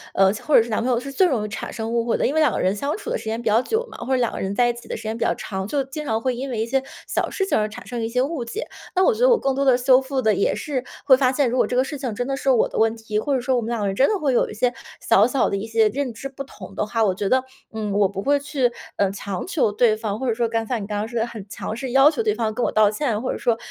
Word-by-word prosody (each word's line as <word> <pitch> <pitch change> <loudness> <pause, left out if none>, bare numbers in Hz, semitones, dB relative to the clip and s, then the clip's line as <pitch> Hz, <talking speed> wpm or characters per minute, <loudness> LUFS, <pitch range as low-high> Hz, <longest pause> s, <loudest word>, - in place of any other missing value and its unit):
呃， 195 0 +5
或 300 +7 0
者 - - +7
是 235 - -9
男 215 - 0
朋 255 - +1
友 240 - +2
是 275 +3 -7
最 370 +7 +3
容 235 -9 0
易 - - -3
产 210 - -6
生 225 0 -4
误 235 -1 +1
会 235 - +1
的。 - - 0
因 - - -1
为 315 - +2
两 305 -5 +4
个 - - -2
人 185 +2 +1
相 280 - -2
处 420 - -7
的 - - 0
时 225 - -11
间 220 +1 -2
比 - - -14
较 220 +2 +4
久 450 - -1
嘛， - - -10
或 240 - -7
者 - - +4
两 240 -2 +1
个 - - -5
人 195 +1 -3
在 245 +2 +4
一 240 - +1
起 235 - -12
的 - - -4
时 - - -10
间 220 0 -3
比 - - -1
较 - - +1
长， 190 -1 -5
就 280 +4 0
经 270 +3 -6
常 220 -4 0
会 255 +1 0
因 265 +3 -4
为 240 -4 -3
一 - - 0
些 265 +3 0 0.3
小 - - -1
事 390 - -1
情 385 - 0
而 215 0 0
产 225 +3 -10
生 240 -1 -4
一 225 - -2
些 250 +2 +1
误 285 -2 -3
解。 410 - -5 0.3
那 370 - +4
我 - - +4
觉 440 - -7
得 - - +5
我 480 - +5
更 270 - 0
多 275 - +1
地 260 -3 +5
修 255 +1 +5
复 265 0 -3
的 220 -3 +3
也 200 - +1
是 270 -4 -3 0.2
会 265 - +8
发 255 -1 +3
现， 270 0 +1
如 240 - -2
果 - - +3
这 - - -2
个 255 - +4
事 290 +2 -5
情 250 -6 -3
真 245 - -2
的 275 - -1
是 275 0 -1
我 250 -4 +4
的 - - -4
问 225 0 +3
题， 220 -2 -3
或 280 +5 0
者 255 - 0
说 255 +1 +1
我 - - 0
们 225 - -4
两 235 -1 -1
个 - - 0
人 195 - -2
真 265 - +4
的 425 - +1
会 280 -5 +1
有 - - +2
一 - - -7
些 245 +3 +1 0.3
小 - - +4
小 260 +1 +1
的 - - -1
一 205 +3 -5
些 225 -1 +3
认 270 +3 -2
知 230 +5 -6
不 275 +1 -7
同 195 -7 -12
的 - - 0
话， 225 +1 0
我 195 -3 +2
觉 195 +1 -2
得， 260 0 +3 0.3
嗯， 215 -2 -3
我 200 -1 +3
不 195 0 -5
会 285 +1 +3
去， 280 -4 0 0.3
嗯， 200 -1 +2
强 200 -1 -5
求 320 - +1
对 215 +1 +3
方 215 -1 -4
或 265 - -3
者 235 - +2
说 235 +1 0
刚 225 0 -1
才 250 - -2
像 225 - -3
你 - - -7
刚 210 -1 -3
刚 210 +1 -2
说 235 0 -3
的 225 - 0
很 220 -4 -8
强 215 0 -5
势 260 +1 -5
要 270 +3 +7
求 455 - -2
对 425 -1 +2
方 220 -2 -1
跟 245 +2 -2
我 - - 0
道 215 -1 +4
歉。 215 - -7 0.2
或 255 - -2
者 - - -3
说 235 -2 +1
240 Hz, 390 characters per minute, -22 LUFS, 220-270 Hz, 0.3 s, 会